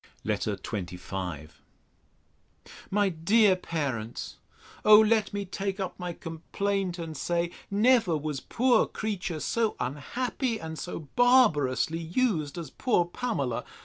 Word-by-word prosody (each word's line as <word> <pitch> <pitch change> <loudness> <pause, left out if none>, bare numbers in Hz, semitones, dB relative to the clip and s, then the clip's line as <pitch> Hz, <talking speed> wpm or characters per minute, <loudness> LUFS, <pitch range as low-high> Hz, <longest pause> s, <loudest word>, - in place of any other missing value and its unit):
LETTER - - -1
XXV 90 -4 -5 1.4
MY 205 0 +2
DEAR 190 +4 +4
PARENTS, 135 -11 -4 0.5
O 210 0 +9
let 220 -1 +3
me 200 -1 -3
take 195 +1 -3
up 190 -2 -2
my 180 -1 -3
complaint, 180 +3 -3
and 165 -2 -6
say, 170 +3 -1 0.2
Never 210 -4 +3
was 150 -2 -3
poor 250 - +2
creature 190 -7 -3
so 225 +6 0
unhappy, 230 - -2
and 160 -1 -6
so 180 - -5
barbarously 165 - +4
used, 165 - 0
as 160 -5 -6
poor 230 -9 +1
Pamela! 170 - -2
175 Hz, 115 wpm, -28 LUFS, 155-215 Hz, 1.4 s, O